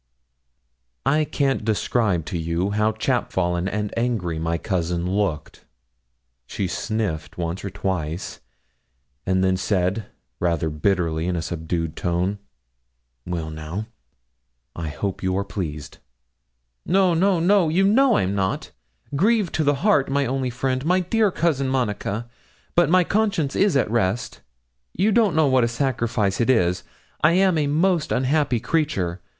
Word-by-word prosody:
I 150 +3 +3
can't 135 -5 0
describe 105 -5 0
to 90 - -3
you 85 +4 -1
how 105 +1 +2
chapfallen 90 -3 0
and 105 +1 -3
angry 110 -9 -1
my 85 +1 -1
cousin 85 -2 -2
looked. 95 -5 -2 0.8
She 100 - -3
sniffed 95 -3 -3
once 85 +1 -3
or 100 - -3
twice, 90 -3 -3 0.9
and 95 0 +2
then 95 0 +2
said, 95 +2 0 0.3
rather 85 -2 0
bitterly, 80 0 0
in 90 - 0
a 85 - -1
subdued 80 0 -3
tone: 90 +3 -1 0.9
'Well, 85 -3 -3
now; 80 +8 -6 0.9
I 85 -2 -4
hope 95 +5 -4
you 95 0 0
are 100 - 0
pleased?' 75 -8 -6 0.8
'No, 185 -1 +3
no, 185 +2 +3
no; 180 0 +3
you 180 +5 +2
know 240 +5 +4
I'm 95 +1 0
not 95 -2 -2 0.4
grieved 205 +3 +2
to 160 - +1
the 145 0 +3
heart, 175 -12 +3
my 140 0 +1
only 130 0 -1
friend, 130 +1 -2
my 180 +4 +2
dear 215 +4 +2
Cousin 150 -7 0
Monica; 120 -3 -2 0.5
but 175 -1 +3
my 180 +1 +5
conscience 200 -7 0
is 195 -7 +3
at 120 - 0
rest; 115 0 -1 0.5
you 205 +4 +2
don't 215 -6 +3
know 160 -1 +4
what 130 -3 +3
a - - +3
sacrifice 115 -5 0
it 120 - +1
is; 90 -8 +3 0.4
I 155 +2 +6
am 190 0 +4
a 145 - +1
most 165 +2 +1
unhappy 130 -1 +1
creature. 105 - -1
110 Hz, 145 wpm, -23 LUFS, -, 0.9 s, I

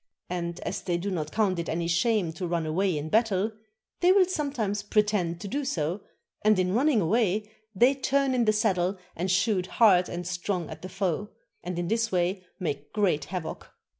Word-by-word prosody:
And, 170 -1 -3
as - - -3
they 175 -2 -1
do 195 +3 -3
not 155 -4 -3
count 200 -5 +1
it 170 - -3
any 170 +1 -1
shame 175 0 +1
to 180 +1 -4
run 170 -1 -1
away 175 +2 0
in 150 +2 -4
battle, 215 0 +2 0.5
they 360 +1 +5
will 380 -1 +6
sometimes 275 - -2
pretend 205 -5 +1
to - - -5
do 285 +8 -2
so, 180 - -2 0.4
and 215 -1 +4
in 185 0 +1
running 255 0 +3
away 210 +2 +1 0.2
they 245 +7 +5
turn 275 0 +1
in 245 -2 +2
the 215 - +5
saddle 195 -3 +1 0.2
and 180 +3 -2
shoot 190 -1 +2
hard 185 -6 +5
and 175 0 -5
strong 180 -1 -3
at - - -9
the 185 - -7
foe, 195 +1 -2 0.3
and 180 0 -4
in 175 0 -2
this 225 +3 0
way 180 +1 0 0.2
make 145 -5 -4
great 195 -8 +1
havoc. 180 -3 -6
190 Hz, 195 wpm, -27 LUFS, 175-220 Hz, 0.5 s, will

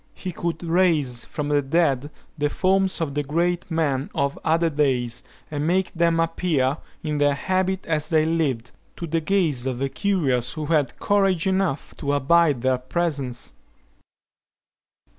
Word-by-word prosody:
He 185 - -5
could 170 +1 -4
raise 165 -8 +2
from 150 -1 -4
the 145 -1 +3
dead 145 -1 +1 0.3
the 145 -1 0
forms 190 +1 +1
of 150 -4 -2
the 145 - 0
great 170 +5 -1
men 150 -5 0
of 140 -2 0
other 165 +1 +2
days, 130 -5 0 0.3
and 150 0 -2
make 185 +2 +1
them 170 -1 +2
appear, 165 -5 +1 0.3
"in 150 -2 -2
their 145 -1 +3
habit 185 +4 -1
as 155 -2 -1
they 155 -1 +3
lived," 140 -8 -1 0.2
to 170 - -5
the 165 0 -1
gaze 155 -8 +1
of 130 -2 -2
the 135 +2 -1
curious 135 - 0
who 155 -2 -4
had 150 -3 +1
courage 195 -3 +2
enough 190 -7 -1
to 140 0 -1
abide 145 -2 +3
their 130 -1 +2
presence. 135 -3 -2
155 Hz, 155 wpm, -23 LUFS, 140-170 Hz, 0.3 s, the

